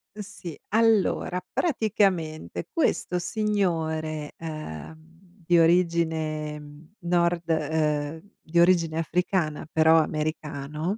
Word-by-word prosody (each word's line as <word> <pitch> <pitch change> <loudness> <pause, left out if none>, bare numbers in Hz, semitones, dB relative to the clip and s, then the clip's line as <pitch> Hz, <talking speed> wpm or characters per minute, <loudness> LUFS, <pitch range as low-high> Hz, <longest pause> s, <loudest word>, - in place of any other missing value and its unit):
Ehm, 210 - -6
sì, 185 -5 -9
allora, 215 -4 +2
praticamente 195 - 0
questo 240 - 0
signore, 160 -7 -1
ehm, 160 - -8 0.3
di 175 0 +4
origine 160 -3 0
nord 170 -1 0
ehm, 155 -1 0 0.2
di 170 +2 0
origine 170 -2 +4
africana, 170 -2 -1
però 160 0 +5
americano, 155 +3 -3
165 Hz, 90 wpm, -26 LUFS, 155-180 Hz, 0.3 s, però